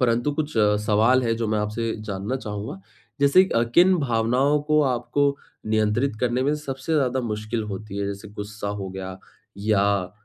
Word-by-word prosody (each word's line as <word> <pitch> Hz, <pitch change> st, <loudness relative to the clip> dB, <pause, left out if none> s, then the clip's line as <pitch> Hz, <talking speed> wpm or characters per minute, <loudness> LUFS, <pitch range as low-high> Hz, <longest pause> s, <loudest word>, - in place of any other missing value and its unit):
परंतु 120 Hz, +2 st, +2 dB
कुछ 155 Hz, 0 st, -2 dB, 0.3 s
सवाल 115 Hz, +5 st, +4 dB
हैं 115 Hz, -2 st, 0 dB
जो 115 Hz, -1 st, -2 dB
मैं 110 Hz, -, +1 dB
आपसे 110 Hz, +2 st, -2 dB
जानना 100 Hz, +4 st, -3 dB
चाहूँगा। 105 Hz, -4 st, -6 dB, 0.4 s
जैसे 140 Hz, +7 st, +6 dB
अ, 115 Hz, -, +4 dB
किन 185 Hz, +1 st, +6 dB
भावनाओं 130 Hz, +3 st, +2 dB
को 150 Hz, 0 st, +3 dB
आपको 140 Hz, +2 st, +1 dB, 0.3 s
नियंत्रित 110 Hz, +3 st, +1 dB
करने 125 Hz, +1 st, +1 dB
में 145 Hz, +2 st, +1 dB
सबसे 145 Hz, +1 st, -4 dB
ज़्यादा 130 Hz, -3 st, +1 dB
मुश्किल 110 Hz, 0 st, -3 dB
होती 105 Hz, 0 st, -6 dB
है 100 Hz, -, -1 dB
जैसे 100 Hz, +1 st, -6 dB
गुस्सा 105 Hz, 0 st, -6 dB
हो 95 Hz, -, -4 dB
गया 95 Hz, 0 st, -6 dB, 0.4 s
या 105 Hz, 0 st, +2 dB
अ 100 Hz, -2 st, +1 dB
115 Hz, 170 wpm, -24 LUFS, 105-135 Hz, 0.4 s, जैसे